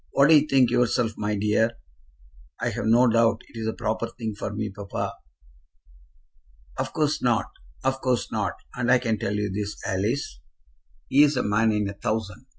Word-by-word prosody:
"What 140 Hz, +2 st, +5 dB
do 160 Hz, -, +8 dB
you 150 Hz, 0 st, +4 dB
think 135 Hz, -4 st, +4 dB
yourself, 120 Hz, -1 st, +2 dB
my 105 Hz, 0 st, -2 dB
dear?" 105 Hz, +3 st, +2 dB, 0.9 s
"I've -, -, -1 dB
no 120 Hz, +3 st, +5 dB
doubt 115 Hz, 0 st, +2 dB
it's 110 Hz, -1 st, -5 dB
the 110 Hz, -, -1 dB
proper 110 Hz, +2 st, -2 dB
thing 115 Hz, -2 st, -5 dB
for 100 Hz, 0 st, -5 dB
me, 105 Hz, 0 st, -3 dB
papa." 100 Hz, 0 st, -4 dB, 1.6 s
"Of -, -, -3 dB
course 150 Hz, -1 st, 0 dB
not; 120 Hz, -4 st, +1 dB, 0.3 s
of 135 Hz, 0 st, 0 dB
course 125 Hz, -3 st, 0 dB
not; -, -, -1 dB, 0.2 s
and 125 Hz, 0 st, 0 dB
I -, -, +7 dB
can 115 Hz, -4 st, -1 dB
tell 100 Hz, -, -2 dB
you 105 Hz, -1 st, -1 dB
this, 105 Hz, +1 st, -4 dB
Alice, 105 Hz, +9 st, -2 dB, 0.7 s
he 140 Hz, -, +5 dB
is 150 Hz, -2 st, +4 dB
a -, -, +1 dB
man 110 Hz, +2 st, +2 dB
in 105 Hz, -1 st, 0 dB
a 100 Hz, -, -4 dB
thousand. 110 Hz, +3 st, -4 dB
115 Hz, 175 wpm, -25 LUFS, 105-125 Hz, 1.6 s, do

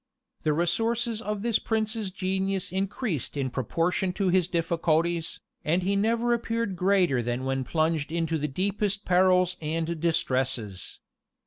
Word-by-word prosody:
The 155 Hz, -, +1 dB
resources 225 Hz, +7 st, 0 dB
of 210 Hz, -2 st, -3 dB
this 230 Hz, -2 st, +2 dB
prince's 220 Hz, -2 st, -1 dB
genius 190 Hz, 0 st, -1 dB
increased 190 Hz, -, -2 dB
in 135 Hz, -2 st, -1 dB
proportion 170 Hz, -, 0 dB
to 190 Hz, 0 st, 0 dB
his 180 Hz, -1 st, +3 dB
difficulties, 165 Hz, -1 st, 0 dB, 0.2 s
and 170 Hz, +4 st, +1 dB
he 195 Hz, +2 st, +1 dB
never 230 Hz, +4 st, +2 dB
appeared 230 Hz, -3 st, -1 dB
greater 180 Hz, -8 st, +3 dB
than 120 Hz, +2 st, -2 dB
when 135 Hz, 0 st, 0 dB
plunged 155 Hz, +1 st, 0 dB
into 165 Hz, -1 st, 0 dB
the 150 Hz, -, -1 dB
deepest 200 Hz, +6 st, -1 dB
perils 180 Hz, 0 st, +4 dB
and 165 Hz, +1 st, -2 dB
distresses. 130 Hz, -, -1 dB
180 Hz, 135 wpm, -27 LUFS, 160-200 Hz, 0.2 s, perils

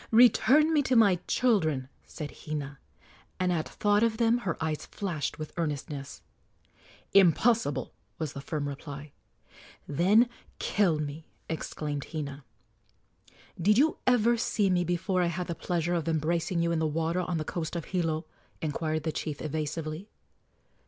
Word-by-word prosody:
"Return 260 Hz, +6 st, +6 dB
me 300 Hz, -, +4 dB
to 260 Hz, -2 st, +1 dB
my 200 Hz, -6 st, +5 dB
children," 160 Hz, -, +2 dB, 0.2 s
said 150 Hz, -3 st, -6 dB, 0.2 s
Hina; 145 Hz, -2 st, -4 dB, 0.6 s
and 185 Hz, -1 st, +2 dB
at 160 Hz, -2 st, -2 dB
thought 205 Hz, 0 st, +2 dB
of 225 Hz, -1 st, +2 dB
them 230 Hz, +1 st, +3 dB
her 190 Hz, -7 st, -2 dB
eyes 160 Hz, -1 st, -2 dB
flashed 175 Hz, -8 st, -3 dB
with 155 Hz, -1 st, -7 dB
earnestness. 145 Hz, -3 st, -4 dB, 0.9 s
"Impossible!" 195 Hz, -, +3 dB, 0.2 s
was 155 Hz, -4 st, -3 dB
the 140 Hz, -, -6 dB
firm 145 Hz, +1 st, -3 dB
reply. 140 Hz, 0 st, -7 dB, 0.8 s
"Then 195 Hz, -, +4 dB, 0.3 s
kill 190 Hz, -7 st, +2 dB
me!" 150 Hz, +1 st, -5 dB, 0.2 s
exclaimed 150 Hz, -3 st, -4 dB
Hina. 145 Hz, -3 st, -5 dB, 1.2 s
"Did 210 Hz, +5 st, +4 dB
you 305 Hz, +4 st, +3 dB
ever 240 Hz, -1 st, +4 dB
see 210 Hz, -3 st, +1 dB
me 175 Hz, -1 st, +2 dB
before 175 Hz, +2 st, 0 dB
I 175 Hz, -, +2 dB
had 175 Hz, +1 st, -2 dB
the 170 Hz, -, -3 dB
pleasure 175 Hz, 0 st, -1 dB
of 170 Hz, -2 st, -1 dB
embracing 165 Hz, +2 st, 0 dB
you 170 Hz, -, +1 dB
in 165 Hz, -, +1 dB
the 160 Hz, -, +1 dB
water 165 Hz, +3 st, 0 dB
on 175 Hz, -1 st, -2 dB
the 155 Hz, -, -3 dB
coast 165 Hz, 0 st, -4 dB
of 170 Hz, -, -3 dB
Hilo?" 165 Hz, -3 st, -1 dB, 0.3 s
inquired 155 Hz, 0 st, -2 dB
the 160 Hz, -, -1 dB
chief, 150 Hz, -2 st, -4 dB
evasively. 155 Hz, +4 st, -4 dB
165 Hz, 150 wpm, -29 LUFS, 155-200 Hz, 1.2 s, Return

